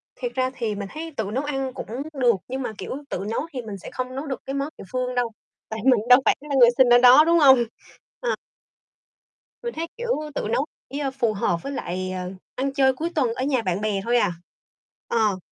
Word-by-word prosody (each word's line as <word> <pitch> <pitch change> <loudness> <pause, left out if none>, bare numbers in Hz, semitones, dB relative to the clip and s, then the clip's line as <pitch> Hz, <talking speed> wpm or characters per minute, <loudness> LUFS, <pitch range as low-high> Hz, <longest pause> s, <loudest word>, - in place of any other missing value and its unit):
Thiệt - - -4
ra 255 0 +1
thì 225 -5 -2
mình 200 -1 -5
thấy 320 +1 -7
tự 210 -2 -2
nấu 265 +3 0
ăn 270 -3 -2
cũng - - -6 0.3
được. 245 -5 +3
Nhưng 265 +1 -4
mà, 245 - -3
kiểu, - - -6 0.2
tự 195 - -3
nấu - - 0
thì 250 - -3
mình 210 -3 -7
sẽ - - -9
không 255 0 -4
nấu 275 +3 -4
được 270 -2 -4
cái 270 - -4
món 280 +2 -2
địa - - -9
phương 250 0 -2
đâu. 240 -2 0 0.4
Tại 220 0 -4
mình 255 -4 +5
đâu 250 +2 +9
phải - - +5
là 280 - 0
người 240 -1 +9
sinh 260 -2 +6
ở - - +9
đó, 250 +4 +8
đúng 335 0 +4
hông? 265 -3 +8
hông? 240 - +1 0.6
Ờ. - - 0 1.3
Mình 475 - -3
thấy, 330 +1 -3
kiểu, 480 0 -4 0.3
tự - - -2
nấu 275 +5 +1 0.2
chỉ, 280 +2 -4
a, 275 -2 -1
phù 235 -5 0
hợp 175 -4 0
với 275 - -4
lại, 185 -6 -3
ờ, 185 0 -4 0.2
ăn 270 +1 -1
chơi 265 -2 +4
cuối 325 +6 -3
tuần 250 -6 +2
ở 255 - -3
nhà 265 -4 +1
bạn 185 0 -1
bè 205 -2 0
thôi 240 +1 +2
à. 180 - +2 0.7
Ờ. 215 -4 +2
255 Hz, 240 wpm, -24 LUFS, 220-275 Hz, 1.3 s, đâu